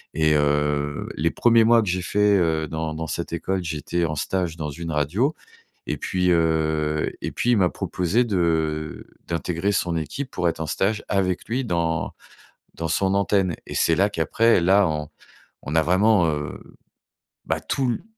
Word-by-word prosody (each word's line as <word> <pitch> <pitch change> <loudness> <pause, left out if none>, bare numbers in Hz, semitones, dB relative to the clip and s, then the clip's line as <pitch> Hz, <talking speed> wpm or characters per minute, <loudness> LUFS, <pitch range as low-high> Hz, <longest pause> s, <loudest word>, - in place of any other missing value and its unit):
et 80 -1 +3
heu, 75 0 0
les 85 +2 +1
1ers 115 +4 +4
mois 115 0 +5
que 100 - -2
j'ai 90 +1 0
fait, 105 +3 +2
heu, 80 -2 +1
dans 80 0 -4
dans 80 +1 -4
cette 85 +1 -4
école, 95 +3 -2
j'étais 85 +2 -2
en 75 -1 -2
stage 85 +2 -2
dans 75 -2 -4
une 80 +3 -6
radio 85 - 0 0.5
et - - -2
puis, 90 -1 0
heu 80 -2 +1
et - - -3
puis 120 - -1
il 120 - +4
m'a 95 -3 +3
proposé 90 +7 0
de 80 -6 -1 0.2
d'intégrer 85 +3 -1
son 90 -4 0
équipe 80 - -4
pour 90 - 0
être 85 - -2
en 80 - -2
stage 100 +7 -1
avec 95 -2 0
lui 125 +4 -1
dans 85 -5 -1 0.6
dans 80 - -4
son 95 +4 +1
antenne 100 -3 +1
et - - -7
c'est 85 - +2
là 95 +4 +3
qu'après, 110 +5 +2
là, 95 +3 +4
on 75 -1 -3 0.6
on 75 +3 -4
a 80 - +5
vraiment, 95 +2 +4
heu, 75 -1 -4 0.9
bah, - - -1
tous 130 -3 -1
l - - -3
t - - -20
85 Hz, 180 wpm, -23 LUFS, 80-100 Hz, 0.9 s, mois